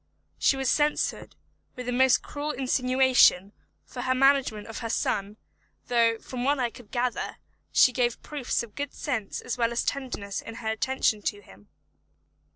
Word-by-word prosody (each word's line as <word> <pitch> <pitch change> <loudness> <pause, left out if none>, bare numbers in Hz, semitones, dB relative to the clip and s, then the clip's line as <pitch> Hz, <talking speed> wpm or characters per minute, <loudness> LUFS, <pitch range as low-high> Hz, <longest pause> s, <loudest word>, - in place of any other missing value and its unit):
She 270 - +3
was 270 -1 -1
censured, 295 +3 0 0.4
with 250 -1 -6
the 250 - -2
most 260 +1 +4
cruel 290 +1 -5
insinuation, 255 -6 +3 0.3
for - - -7
her 255 0 +1
management 270 -5 +3
of 225 - -7
her 230 - -4
son, 205 -1 -1 0.5
though, 230 -2 +3
from 245 +2 -6
what 285 +3 +2
I 245 -3 -1
could 230 -3 -14
gather, 245 -1 -2 0.3
she 255 - +6
gave 245 -2 -1
proofs 280 -5 -2
of 225 -3 -11
good 285 -1 -5
sense 225 -9 -3
as 245 - -4
well 230 0 +2
as 235 - 0
tenderness 245 -8 -3
in 225 - -9
her 225 -1 -4
attention 220 -1 0
to 205 0 -3
him. 100 - -18
245 Hz, 165 wpm, -27 LUFS, 225-265 Hz, 0.5 s, she